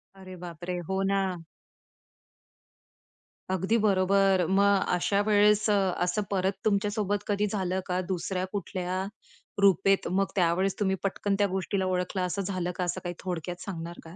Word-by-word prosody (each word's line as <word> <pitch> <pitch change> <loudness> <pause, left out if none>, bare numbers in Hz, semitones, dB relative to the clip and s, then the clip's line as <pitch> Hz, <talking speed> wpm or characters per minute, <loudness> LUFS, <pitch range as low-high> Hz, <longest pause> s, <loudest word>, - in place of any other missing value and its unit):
अरे 185 -1 -10
बापरे! 175 +1 -5
हो 190 0 0
ना. 195 -3 0 2.1
अगदी 190 +5 +1
बरोबर. 195 -2 +3
मग 200 0 +4
अशावेळेस 205 +3 +3
अ, - - +4 0.3
असं 180 +4 0
परत 190 -1 +1
तुमच्यासोबत 205 -1 0
कधी 205 0 +1
झालं 190 -2 -1
का? 180 0 0
दुसऱ्या 185 0 -2
कुठल्या 185 -2 -3 0.6
रूपेत 195 0 +4
मग, 195 +2 +2
त्यावेळेस 185 +1 +1
तुम्ही 190 -2 +1
पटकन 200 0 0
त्या 205 - +4
गोष्टीला 190 0 -1
ओळखलं 185 +1 -1
असं 180 +3 -2
झालं 185 -2 -2
का? 185 - -2
असं 175 0 -2
काही 175 -1 -4
थोडक्यात 175 0 -4
सांगणार 170 -3 -6
का? 165 +1 -12
190 Hz, 140 wpm, -28 LUFS, 180-200 Hz, 2.1 s, मग